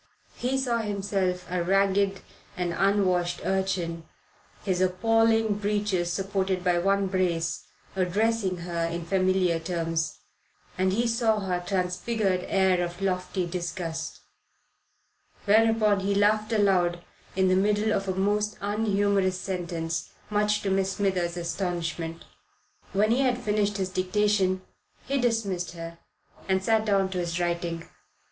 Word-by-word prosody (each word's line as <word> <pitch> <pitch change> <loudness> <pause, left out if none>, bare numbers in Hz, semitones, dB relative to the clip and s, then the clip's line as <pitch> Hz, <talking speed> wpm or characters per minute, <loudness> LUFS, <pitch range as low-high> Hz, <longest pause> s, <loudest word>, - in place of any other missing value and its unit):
He 255 +2 -1
saw 245 -3 0
himself 195 -4 -1
a 180 0 -1
ragged 195 +1 +2 0.4
and 175 -1 -1
unwashed 185 -2 +1
urchin, 190 -4 -1 0.6
his 185 -2 0
appalling 225 +3 +2
breeches 205 -4 0
supported 190 0 -1
by 175 -1 +2
one 195 +2 +2
brace, 180 -3 -1 0.3
addressing 195 +1 +1
her 170 -1 -2
in 170 0 -4
familiar 185 -1 +2
terms; 165 -2 -2 0.6
and 185 0 +1
he 230 +5 +1
saw 225 -2 +1
her 180 -2 -1
transfigured 185 +2 -1
air 190 -2 +3
of 175 0 -5
lofty 185 -1 -1
disgust; 175 -1 -4 1.2
whereupon 215 -1 +4
he 200 +1 0
laughed 215 +2 +2
aloud 180 -5 +2 0.3
in 190 0 +3
the 185 - +4
middle 210 +3 +2
of 195 0 -1
a 190 - -1
most 210 +2 0
unhumorous 200 -2 +1
sentence, 170 -3 -3 0.2
much 210 0 +1
to 195 - 0
Miss 195 0 +1
Smithers' 180 -4 0
astonishment. 170 -2 -3 0.7
When 210 +3 +2
he 245 - +3
had 255 -3 +2
finished 210 -3 0
his 190 -1 -1
dictation 185 0 +1 0.4
he 275 -1 0
dismissed 200 -8 -1
her 165 0 -8 0.5
and 190 0 +2
sat 220 +1 +2
down 195 -2 +2
to 185 - -2
his 170 0 -2
writing. 170 -1 -2
190 Hz, 130 wpm, -27 LUFS, 180-205 Hz, 1.2 s, whereupon